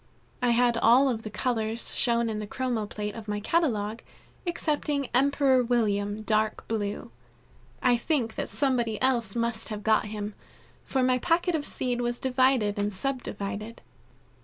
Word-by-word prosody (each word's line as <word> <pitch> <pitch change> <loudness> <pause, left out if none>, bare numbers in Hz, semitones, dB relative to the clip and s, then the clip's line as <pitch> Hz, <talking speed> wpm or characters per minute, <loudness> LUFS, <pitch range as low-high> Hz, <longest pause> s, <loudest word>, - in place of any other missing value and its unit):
I 245 - +2
had 240 0 +3
all 245 +4 +5
of 230 -3 -2
the 215 - -6
colors 225 0 -2
shown 235 -2 +2
in 215 -1 -2
the 210 - -5
chromo 240 -2 -2
plate 210 0 -4
of 225 -2 -9
my 210 0 -2
catalogue, 225 -5 0 0.5
excepting 295 -5 -1
Emperor 270 0 +4
William, 210 -3 0
dark 215 0 0
blue. 205 -2 -3 0.7
I 245 -1 +4
think 235 -4 -1
that - - -4
somebody 240 -6 0
else 240 -6 +1
must 230 -1 -1
have 210 -1 -5
got 220 -1 +3
him, 210 0 -5 0.5
for 265 -1 0
my 255 0 +3
packet 345 +4 +1
of 300 -3 0
seed 245 -1 -1
was 240 0 -2
divided 255 -5 +2
and 205 0 0
sub 260 +6 -2
divided. 210 +3 -6
235 Hz, 160 wpm, -27 LUFS, 215-255 Hz, 0.7 s, all